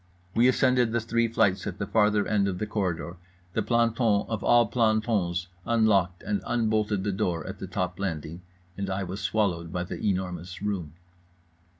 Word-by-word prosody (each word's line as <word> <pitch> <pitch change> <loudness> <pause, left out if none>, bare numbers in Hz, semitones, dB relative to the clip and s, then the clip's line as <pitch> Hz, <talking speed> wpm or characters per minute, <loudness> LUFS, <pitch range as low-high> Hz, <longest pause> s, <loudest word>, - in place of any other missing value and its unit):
We 120 +2 +4
ascended 125 -2 +3
the 115 - +2
three 115 +1 +1
flights 110 -5 +1
at 100 -1 -4
the 100 - -2
farther 105 -1 +2
end 100 -2 +1
of 95 -2 -2
the 110 - -2
corridor, 90 -5 -2 0.4
the - - +1
planton 115 -3 +2
of 110 -2 -3
all 120 0 +5
plantons 110 -6 +1 0.2
unlocked 100 -6 +2
and 205 -1 -1
unbolted 110 -4 0
the 100 - 0
door 90 -5 -1
at - - -7
the - - -5
top 90 0 -3
landing, 85 -3 -4 0.3
and 100 -1 -3
I 95 +1 -1
was 95 +3 -5
swallowed 90 -4 0
by 90 0 -2
The 90 - -7
Enormous 90 -3 -2
Room. 95 -7 -3
100 Hz, 175 wpm, -27 LUFS, 90-110 Hz, 0.4 s, all